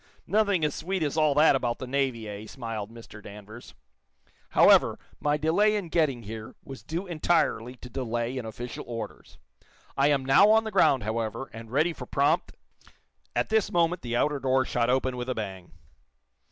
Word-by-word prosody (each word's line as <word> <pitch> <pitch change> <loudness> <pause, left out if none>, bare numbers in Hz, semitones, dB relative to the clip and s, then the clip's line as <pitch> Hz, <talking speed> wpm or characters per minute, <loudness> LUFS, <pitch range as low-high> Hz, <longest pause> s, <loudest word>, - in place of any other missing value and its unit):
"Nothing 200 -6 +2
as 150 - -1
sweet 185 0 -2
as 145 -1 -1
all 155 -3 +3
that 150 -1 +6
about 120 -3 -1
the - - -6
Navy, 130 -4 -1
eh?" 105 +1 -7
smiled 115 -4 -6
Mr. 115 -2 -12
Danvers. 105 +3 -12 0.7
"However, - - +5 0.2
my 150 0 +1
delay 185 +8 +2
in 195 -5 -3
getting 150 -8 +1
here 110 +1 -8
was 135 -4 -10
due 170 +5 -4
entirely 155 -8 0
to 125 - -11
delay 120 -1 -3
in 130 - -3
official 120 +2 -7
orders. 115 -1 -7 0.6
I 135 +1 +3
am 140 -3 +1
now 185 +10 +6
on 220 +1 +5
the 220 - -5
ground, 140 - +3
however, 110 +3 -3
and 115 0 -9
ready 155 +7 +1
for - - -9
prompt 145 +4 +1 0.4
" - - -41
At - - 0
this 220 -2 +1
moment 175 0 +1
the 120 -1 -3
outer 145 +3 +1
door 130 0 +2
shot 120 -1 0
open 130 0 0
with 125 +1 -4
a 130 - -1
bang. 95 -5 -6
130 Hz, 180 wpm, -27 LUFS, 115-160 Hz, 0.7 s, that